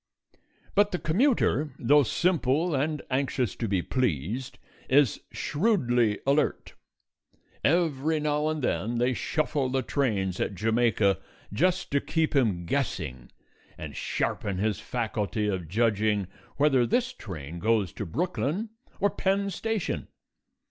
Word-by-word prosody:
But 205 0 +4
the 180 - 0
commuter, 160 - +1
though 145 +5 +5
simple 160 +2 +1
and 150 +2 -1
anxious 130 -4 0
to 115 - -2
be 95 -4 0
pleased, 120 - -2 0.3
is 135 -4 +4
shrewdly 125 - +1
alert. 140 +2 +1 0.9
Every 160 -2 +2
now 150 0 0
and 155 -2 -2
then 120 0 0
they 125 +2 +2
shuffle 145 0 -1
the 130 0 0
trains 100 -10 0
at 100 - -1
Jamaica 110 -2 +2 0.3
just 180 - +1
to 140 0 +2
keep 160 -2 0
him 105 -10 +2
guessing 65 -6 -3 0.5
and - - -7
sharpen 100 -2 -2
his 105 +1 0
faculty 110 -3 -2
of 95 -5 -2
judging 105 0 +1 0.3
whether 135 -4 +4
this 255 - +1
train 85 - -7
goes 110 -2 +1
to - - -5
Brooklyn 180 - -2 0.3
or 205 0 +2
Penn 200 +1 0
Station. 220 +1 -2
130 Hz, 125 wpm, -27 LUFS, 105-155 Hz, 0.9 s, though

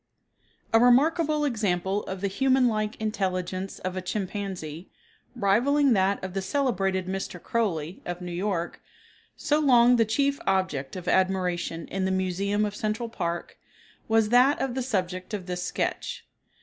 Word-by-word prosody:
A 225 - +7
remarkable 300 +5 +4
example 200 -5 0
of 190 0 -6
the 200 - +1
human 260 +5 +3
like 215 -1 -1
intelligence 190 -3 -2
of 185 0 -4
a 185 - -2
chimpanzee, 185 -4 -5 0.5
rivaling 260 +7 +3
that 195 -1 +1
of 190 -1 -5
the 195 - -1
celebrated 195 -5 0
"Mr. 190 -1 -4
Crowley," 175 -7 -2
of 175 0 -5
New 180 -1 -6
York, 175 -1 -2 0.6
so 300 +1 +1
long 245 -4 +5
the 230 - +5
chief 280 +6 +1
object 185 -8 0
of 180 -1 -7
admiration 180 -3 0
in 190 0 -1
the - - +1
museum 190 +3 0
of 205 0 -4
Central 215 +3 -2
Park, 170 -6 -4 0.5
was 220 -1 +3
that 250 +4 +5
of 265 -2 -1
the 260 - -2
subject 185 -4 -2
of 190 -3 -6
this 180 0 -4
sketch. - - -3
195 Hz, 150 wpm, -26 LUFS, 185-235 Hz, 0.6 s, A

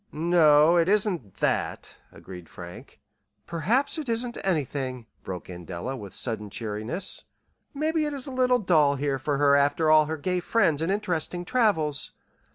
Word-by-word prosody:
"No, 160 0 +4
it 170 +1 +3
isn't 190 - 0
that," - - -2 0.2
agreed 90 -3 -12
Frank. 90 -2 -11 0.5
"Perhaps 225 - 0
it 290 -5 -5
isn't 235 +1 -1
anything," 135 -8 -2 0.2
broke 90 -2 -7
in 90 -1 -9
Della, 90 +10 -5
with 100 -6 -9
sudden 110 -4 -3
cheeriness. 110 - -2 0.5
"Maybe 310 +2 0
it 295 - -4
is 270 - -2
a 275 - -6
little 255 -1 +2
dull 155 -9 +3
here 140 -1 -1
for 145 +1 -1
her 140 0 +4
after 145 +3 +2
all 155 -1 +6
her 160 +1 -3
gay 180 +4 -1
friends 170 -6 +1
and 165 +3 0
interesting 175 -3 -2
travels. 170 - +1
155 Hz, 160 wpm, -26 LUFS, 135-200 Hz, 0.5 s, all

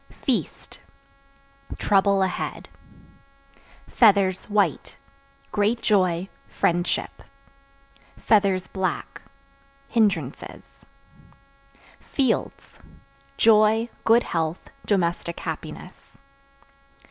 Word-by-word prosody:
Feast - - -4 1.0
Trouble 200 -1 +2
ahead. 190 - -4 1.2
Feathers 200 -5 +3
(White) 210 -1 -1 0.5
great 210 +3 +1
joy, 185 -5 +1 0.2
friendship; 175 +1 -1 1.5
(black) 190 -2 -3 0.7
hindrances. 190 - -1 1.4
Fields 265 -5 -2 0.6
Joy, 220 +1 +4
good 230 +2 +4
health, 165 0 -3 0.2
domestic 170 -3 -1
happiness. - - -8
200 Hz, 55 wpm, -24 LUFS, 175-215 Hz, 1.5 s, Joy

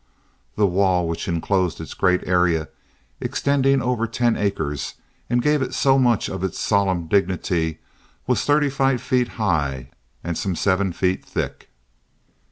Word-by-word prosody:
The 105 - +3
wall 90 -2 +2
which 85 0 -4
inclosed 90 0 0
its 80 - -7
great 90 -1 +1
area 90 -3 +2 0.5
extending 135 -1 +1
over 120 -2 0
ten 120 +1 +1
acres 75 -10 -2 0.3
and 120 0 +1
gave 150 -1 +2
it 130 - -2
so 135 0 +3
much 120 -4 +2
of 95 -1 -5
its 95 - -2
solemn 95 -5 +1
dignity 90 -3 0 0.5
was - - +1
thirty 145 -1 +2
five 135 -2 +1
feet 125 -1 +1
high 70 - -1 0.3
and 85 0 -3
some 95 +1 -2
seven 95 +1 +1
feet 90 +2 -1
thick. - - -5
95 Hz, 145 wpm, -22 LUFS, 85-125 Hz, 0.5 s, The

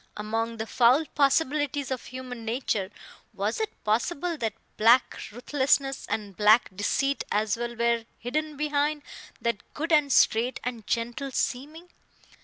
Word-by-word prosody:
Among 225 +2 -2
the 220 - -3
foul 250 +7 +4
possibilities 285 -1 +1
of 255 - -3
human 255 -2 -7
nature, 225 -4 -1 0.5
was 205 +3 -1
it 440 -1 -4
possible 310 +10 0
that 225 -5 -2 0.2
black 235 +4 +4 0.2
ruthlessness 270 +3 0
and 205 -3 -3
black 210 -1 +4
deceit 275 +8 0
as 215 +1 +1
well 240 0 -4
were 235 0 +1
hidden 300 +5 -3
behind 295 0 0 0.4
that 235 -3 -3
good 325 +3 -3
and 300 -3 +4
straight 240 +1 +3
and 235 -4 -5
gentle 240 +4 -2
seeming? 295 +7 -3
250 Hz, 135 wpm, -27 LUFS, 225-285 Hz, 0.5 s, foul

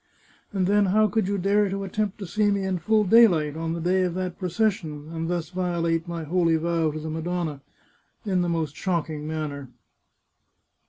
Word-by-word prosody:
And 190 -2 0
then, 205 +1 +3
how 215 +3 +4
could 215 -2 0
you 200 0 0
dare 200 +2 +2
to 195 +1 -3
attempt 205 +1 -2
to 200 - -6
see 210 +4 +1
me 200 -1 0
in 190 -2 -1
full 215 +6 +2
daylight, 180 -9 +5
on 165 0 -3
the 170 - -3
day 180 +3 +2
of 180 -2 -1
that 185 -1 -4
procession, 180 -6 -1
and 165 0 -3
thus 170 -3 -2
violate 170 -2 -1
my 170 -1 -4
holy 165 +1 +2
vow 165 0 +1
to 155 +1 -5
the 155 0 -5
Madonna, 160 -2 -3 0.6
in 190 -3 +1
the 175 - 0
most 160 -4 -2
shocking 160 -4 -2
manner? 150 -4 -4
175 Hz, 190 wpm, -25 LUFS, 160-195 Hz, 0.6 s, daylight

